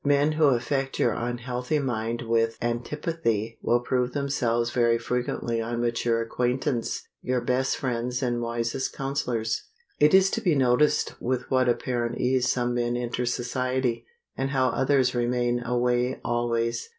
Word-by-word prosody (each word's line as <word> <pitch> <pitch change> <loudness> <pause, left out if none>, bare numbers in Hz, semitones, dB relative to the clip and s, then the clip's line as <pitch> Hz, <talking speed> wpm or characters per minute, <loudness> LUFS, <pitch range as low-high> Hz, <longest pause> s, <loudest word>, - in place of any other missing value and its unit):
Men 145 +1 +3
who 155 0 +3
affect 135 +1 +1
your 120 - +2
unhealthy 125 +4 -2
mind 120 -3 -2
with 115 0 +1
antipathy 120 -2 -2
will 120 +1 +2
prove 125 0 0
themselves 120 -5 0
very 115 -1 +3
frequently 120 -1 -2
on 120 +1 -3
mature 115 -1 +1
acquaintance 125 +1 -1
your 125 0 0
best 125 +2 0
friends 125 0 -2
and 120 -1 0
wisest 115 +2 -2
counselors. 125 -5 -2 0.4
It 150 +4 +6
is 190 0 +5
to - - -1
be 175 -5 +2
noticed 130 +2 +2
with 125 0 -2
what 130 -1 +3
apparent 120 -1 -1
ease 125 0 +1
some 120 -1 0
men 120 0 0
enter 125 0 -2
society, 125 0 -1 0.3
and 135 - -1
how 130 -2 +2
others 130 0 +2
remain 120 0 0
away 125 +1 0
always. 120 - -1
125 Hz, 145 wpm, -26 LUFS, 120-130 Hz, 0.4 s, It